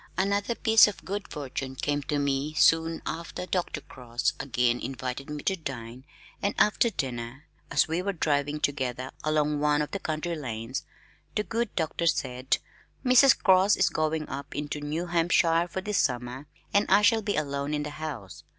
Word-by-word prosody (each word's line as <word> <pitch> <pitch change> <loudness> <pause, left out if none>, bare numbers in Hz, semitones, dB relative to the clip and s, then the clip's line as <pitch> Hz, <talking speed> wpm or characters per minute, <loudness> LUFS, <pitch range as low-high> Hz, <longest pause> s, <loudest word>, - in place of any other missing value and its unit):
Another 200 +4 +1
piece 225 -2 +6
of 210 - -6
good 200 +1 -4
fortune 135 -2 -5
came 145 +2 -1
to 145 +1 -2
me 140 +1 -1
soon 165 +1 +3
after. 170 +2 -5
Dr. 180 -5 -2
Cross 120 -3 -2
again 125 -2 +1
invited 130 +2 -5
me 150 -1 -5
to 190 - +1
dine 130 -6 -7 0.4
and 200 - 0
after 210 +3 +4
dinner 130 - -5 0.2
as - - +3
we 165 +3 -1
were 200 +2 -1
driving 145 -4 0
together 130 -3 -2
along 150 -1 +1
one 150 0 +2
of 150 - -2
the 200 - -3
country 160 0 -3
lanes, 120 -3 -5 0.5
the 210 - +1
good 230 0 -2
doctor 170 0 -1
said, 130 -4 +1 0.5
"Mrs. 255 +1 +7
Cross 190 +1 +5
is 190 - +3
going 155 0 -1
up 140 +2 -7
into 150 0 -3
New 155 +4 -2
Hampshire 170 0 +3
for 190 +2 -4
the 210 +2 -4
summer 125 -4 -1 0.3
and 200 +1 +3
I 200 +2 +5
shall 220 +2 +5
be 205 -1 -1
alone 140 -1 -2
in 150 - -2
the 150 - -5
house. 145 - -7
150 Hz, 175 wpm, -27 LUFS, 135-180 Hz, 0.5 s, Mrs